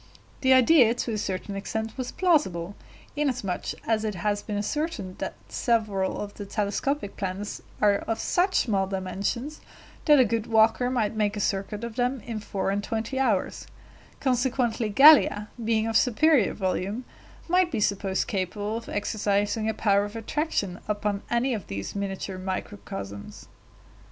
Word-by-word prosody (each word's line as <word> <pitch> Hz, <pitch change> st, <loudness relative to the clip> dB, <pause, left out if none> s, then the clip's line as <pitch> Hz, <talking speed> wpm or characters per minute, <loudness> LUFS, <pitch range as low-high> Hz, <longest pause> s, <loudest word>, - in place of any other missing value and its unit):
The 260 Hz, -, +3 dB
idea 255 Hz, -2 st, +6 dB
to 240 Hz, -, -2 dB
a -, -, -1 dB
certain 195 Hz, +1 st, -3 dB
extent 220 Hz, +3 st, -4 dB
was 255 Hz, -1 st, -4 dB
plausible, 205 Hz, -, +1 dB, 0.4 s
inasmuch 255 Hz, -11 st, -1 dB, 0.2 s
as 220 Hz, -1 st, +1 dB
it 215 Hz, -2 st, -2 dB
has 205 Hz, +3 st, -1 dB
been 210 Hz, -1 st, -4 dB
ascertained 210 Hz, -, -3 dB
that -, -, -4 dB
several 215 Hz, -5 st, 0 dB
of 205 Hz, 0 st, -5 dB
the 205 Hz, -, -7 dB
telescopic 210 Hz, +4 st, -2 dB
planets 195 Hz, +1 st, -4 dB, 0.2 s
are 205 Hz, -1 st, +4 dB
of 225 Hz, +2 st, -3 dB
such 370 Hz, +2 st, +1 dB
small 195 Hz, -5 st, 0 dB
dimensions 200 Hz, +9 st, -3 dB, 0.4 s
that 295 Hz, -2 st, +7 dB
a 255 Hz, -, +6 dB
good 225 Hz, 0 st, -1 dB
walker 225 Hz, +2 st, +3 dB
might 230 Hz, -5 st, 0 dB
make 210 Hz, -1 st, 0 dB
a -, -, -2 dB
circuit 200 Hz, +2 st, -2 dB
of 235 Hz, 0 st, -6 dB
them 250 Hz, 0 st, 0 dB
in 225 Hz, -1 st, -5 dB
four 195 Hz, -2 st, -2 dB
and 200 Hz, +1 st, -1 dB
twenty 225 Hz, +5 st, -3 dB
hours; 225 Hz, -8 st, 0 dB, 0.5 s
consequently 245 Hz, -3 st, 0 dB
Gallia, 240 Hz, -4 st, +7 dB
being 220 Hz, -1 st, +1 dB
of 225 Hz, 0 st, -2 dB
superior 260 Hz, 0 st, +4 dB
volume, 195 Hz, +5 st, -2 dB, 0.4 s
might 360 Hz, +1 st, +3 dB
be -, -, -1 dB
supposed 200 Hz, -2 st, 0 dB
capable 205 Hz, +3 st, -2 dB
of 230 Hz, -, -8 dB
exercising 205 Hz, +1 st, 0 dB
a -, -, 0 dB
power 200 Hz, -2 st, +3 dB
of 205 Hz, +2 st, -6 dB
attraction 225 Hz, -, -2 dB
upon 205 Hz, -1 st, -1 dB
any 240 Hz, +2 st, +1 dB
of 210 Hz, -6 st, -5 dB
these 100 Hz, 0 st, -5 dB
miniature 195 Hz, -1 st, -4 dB
microcosms. 185 Hz, -, -6 dB
215 Hz, 155 wpm, -26 LUFS, 200-245 Hz, 0.5 s, that